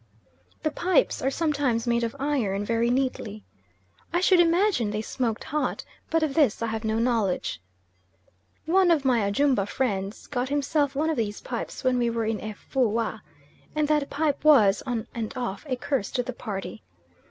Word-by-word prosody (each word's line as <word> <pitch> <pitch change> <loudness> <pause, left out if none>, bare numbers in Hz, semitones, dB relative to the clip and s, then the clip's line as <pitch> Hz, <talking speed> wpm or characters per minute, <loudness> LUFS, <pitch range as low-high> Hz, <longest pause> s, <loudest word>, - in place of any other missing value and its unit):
The 310 - +1
pipes 370 +10 +1
are 265 - +1
sometimes 280 -6 0
made 235 0 +1
of 230 +2 -2
iron 230 -9 0
very 230 +2 +1
neatly. 245 -5 -2 0.7
I 345 - +2
should 370 0 +4
imagine 345 - +3
they 210 +1 -2
smoked 230 -2 -2
hot, 300 +1 -2 0.2
but 325 -1 +2
of 300 -3 0
this 275 -8 +2
I 225 -1 -1
have 220 0 -3
no 220 0 0
knowledge. 225 - 0 1.0
One 370 +2 +4
of 310 -5 +3
my 250 -3 +4
Ajumba 210 +1 +2
friends 200 -5 -2
got 255 -2 -2
himself 285 0 0
one 315 +3 +1
of 315 - -2
these 210 -3 -2
pipes 240 +2 -5
when 255 -1 +2
we 240 -1 +2
were 230 -1 -1
in 220 -1 -1
Efoua, 220 0 -1 0.5
and 305 -1 +1
that 300 -2 +2
pipe 295 0 -1
was, 225 -10 +6
on 235 -3 -2
and 225 +1 -4
off, 245 +2 -4
a 255 - +1
curse 250 -3 -2
to 250 - 0
the 255 +1 -5
party. 195 - -6
250 Hz, 175 wpm, -26 LUFS, 220-290 Hz, 1.0 s, was